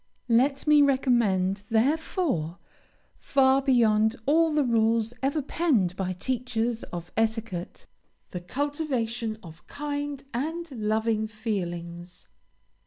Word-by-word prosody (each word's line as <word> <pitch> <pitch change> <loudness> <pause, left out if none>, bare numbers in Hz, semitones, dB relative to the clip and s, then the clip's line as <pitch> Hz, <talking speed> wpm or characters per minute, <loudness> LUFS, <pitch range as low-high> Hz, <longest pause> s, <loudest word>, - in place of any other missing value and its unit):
Let 270 +4 +2
me 300 -1 +6
recommend, 230 -9 +2
therefore, 240 - 0 0.6
far 270 0 +3
beyond 225 -4 +3
all 320 +3 +3
the 300 -1 +2
rules 230 -1 +1
ever 280 +2 0
penned 255 - +1
by 185 -1 -2
teachers 240 +2 -2
of 175 0 -8
etiquette, 220 -5 -2 0.5
the 180 - -5
cultivation 240 - -2
of 165 0 -13
kind 290 -1 -4
and 320 +7 -3
loving 220 -1 0
feelings. 175 -5 -5
230 Hz, 105 wpm, -26 LUFS, 210-275 Hz, 0.6 s, me